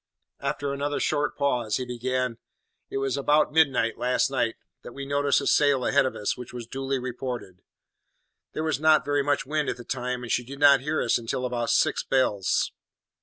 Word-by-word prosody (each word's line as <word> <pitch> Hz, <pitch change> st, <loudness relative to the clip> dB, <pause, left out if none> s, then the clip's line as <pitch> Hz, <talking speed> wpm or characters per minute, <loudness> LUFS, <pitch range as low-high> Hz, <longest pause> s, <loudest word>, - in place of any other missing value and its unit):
After 140 Hz, 0 st, -2 dB
another 145 Hz, +1 st, -2 dB
short 145 Hz, -1 st, 0 dB
pause, 125 Hz, -7 st, 0 dB
he 130 Hz, -, -3 dB
began: 125 Hz, 0 st, -2 dB, 0.5 s
"It -, -, -3 dB
was 135 Hz, 0 st, -1 dB
about 150 Hz, +2 st, +2 dB
midnight, 135 Hz, -8 st, +2 dB
last 125 Hz, +2 st, +1 dB
night, 115 Hz, -4 st, 0 dB, 0.3 s
that -, -, -10 dB
we 140 Hz, 0 st, -6 dB
noticed 140 Hz, 0 st, +2 dB
a -, -, -5 dB
sail 140 Hz, -3 st, +3 dB
ahead 140 Hz, -1 st, +3 dB
of -, -, -5 dB
us, 105 Hz, -, -1 dB
which 125 Hz, -1 st, -10 dB
was 120 Hz, -2 st, -6 dB
duly 135 Hz, +3 st, -3 dB
reported. 125 Hz, -6 st, -6 dB, 0.9 s
There 155 Hz, -, -3 dB
was 155 Hz, -4 st, 0 dB
not 155 Hz, 0 st, +4 dB
very 145 Hz, 0 st, +1 dB
much 145 Hz, 0 st, 0 dB
wind 150 Hz, +1 st, -1 dB
at -, -, -3 dB
the 120 Hz, -, -9 dB
time, 125 Hz, 0 st, -3 dB
and 120 Hz, -, -5 dB
she 125 Hz, -, +1 dB
did 135 Hz, +3 st, -9 dB
not 140 Hz, -1 st, +6 dB
near 150 Hz, +4 st, -1 dB
us 115 Hz, -, +2 dB
until 120 Hz, +2 st, -3 dB
about 120 Hz, -2 st, -2 dB
six -, -, +2 dB
bells. 115 Hz, -8 st, +1 dB
135 Hz, 195 wpm, -26 LUFS, 125-145 Hz, 0.9 s, not